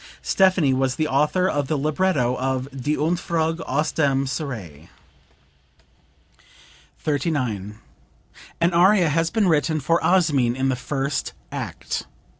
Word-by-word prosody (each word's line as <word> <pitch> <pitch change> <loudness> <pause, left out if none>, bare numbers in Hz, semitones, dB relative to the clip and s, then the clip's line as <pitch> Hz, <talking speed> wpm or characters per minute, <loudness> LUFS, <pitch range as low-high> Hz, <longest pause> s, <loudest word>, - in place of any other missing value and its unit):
Stephanie 185 -8 +3
was 130 0 0
the 155 - 0
author 150 +7 +2
of 145 -6 -1
the 155 - 0
libretto 150 -3 +1
of 130 0 -2
"Die 135 +2 -2
Entfuhrung 165 0 -1
aus 150 +4 0
dem 140 -3 +1
Serail.") 110 - -6 2.1
39. 125 - -2 0.8
"An 170 +1 +2
aria 180 0 +5
has 165 +2 +1
been 215 -1 +1
written 155 -1 +2
for 165 +4 +1
Osmin 145 -10 +2
in 135 +1 0
the 130 - +1
first 135 +2 -3 0.2
act.... - - -5
145 Hz, 120 wpm, -23 LUFS, 130-165 Hz, 2.1 s, aria